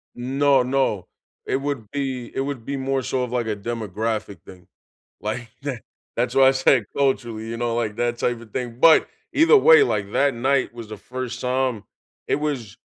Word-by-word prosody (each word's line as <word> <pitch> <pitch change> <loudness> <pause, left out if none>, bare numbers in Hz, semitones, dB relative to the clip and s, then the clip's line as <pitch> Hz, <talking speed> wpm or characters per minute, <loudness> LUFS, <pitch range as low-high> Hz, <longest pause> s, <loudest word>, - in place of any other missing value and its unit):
No, 135 +2 +2
no. 125 -8 0 0.4
It - - 0
would 135 -6 -4
be 135 -4 -3
It - - -1
would 135 -4 -4
be 140 - -3
more 135 0 -1
so 130 0 -1
of, 125 -1 -4
like, 120 -2 -1
a 105 -2 -2
demographic 110 -2 -4
thing, 90 -2 -14 0.5
like 115 +3 -4
the 135 -6 -4 0.4
That's 125 +1 0
why 135 0 +6
I - - +7
say 130 -2 +3
culturally, 120 -5 0
you 115 - -4
know, 120 -1 -1
like, 110 -3 -2
that 120 0 -1
type 120 -1 -1
of 115 -2 -14
thing, 120 -2 -4
but 165 -1 +6 0.2
either 330 +9 +6
way, 455 +1 +7
like, 100 - -1
that 140 -1 +3
night 130 +1 +1
was 115 -2 -9
the 110 - -7
1st 125 +2 -6
time, 125 -4 -1 0.4
it - - +2
was 140 -9 -3
125 Hz, 190 wpm, -23 LUFS, 115-135 Hz, 0.5 s, I